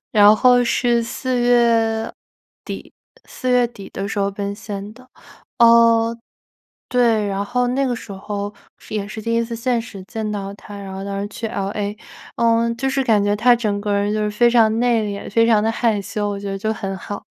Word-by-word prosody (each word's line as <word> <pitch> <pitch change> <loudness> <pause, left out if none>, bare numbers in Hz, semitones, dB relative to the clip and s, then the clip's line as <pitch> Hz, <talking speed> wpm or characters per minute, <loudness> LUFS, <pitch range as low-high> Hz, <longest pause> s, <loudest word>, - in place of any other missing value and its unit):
然 210 -1 +7
后 245 +1 +5
是 240 0 +1
4 255 +2 -2
月 230 -2 +2 0.5
底， - - -7 0.3
4 255 - -6
月 250 -1 +4
底 220 -5 -11
的 195 - -5
时 200 - -4
候 200 0 +1
奔 200 0 -4
现 205 -1 -7
的。 255 +3 -18 0.5
哦， 230 -1 +5 0.7
对， 230 -4 +2
然 200 0 -2
后 245 +3 0
那 265 +3 0
个 250 -2 -1
时 225 - -9
候， 200 +1 -5 0.2
是 - - -12
也 200 -1 -2
是 220 +1 -7
第 230 +2 -2
1 230 - +2
次 230 0 -5
现 235 0 0
实 215 -4 -10
见 215 +2 -5
到 200 -1 -4
他， 205 0 -11
然 195 -1 -8
后 190 0 -6
当 200 0 -3
时 200 - -3
去 225 - -6
LA。 205 0 -3 0.4
嗯， 230 0 +2
就 270 +2 -1
是 270 0 0
感 220 -5 +3
觉 205 0 +1
他 240 +3 +5
整 210 -4 -1
个 205 -1 -1
人 200 +1 0
就 215 - -1
是 210 - 0
非 235 +3 +4
常 225 -2 +3
内 240 -2 +2
敛， 200 -1 -5
非 230 +2 +4
常 220 -2 +4
的 225 - +1
害 225 -3 0
羞， 205 +1 -3
我 200 - -3
觉 200 0 -5
得 195 - -3
就 215 +3 -1
很 195 -3 -5
好。 205 +2 -7
220 Hz, 220 characters per minute, -20 LUFS, 205-235 Hz, 0.7 s, 然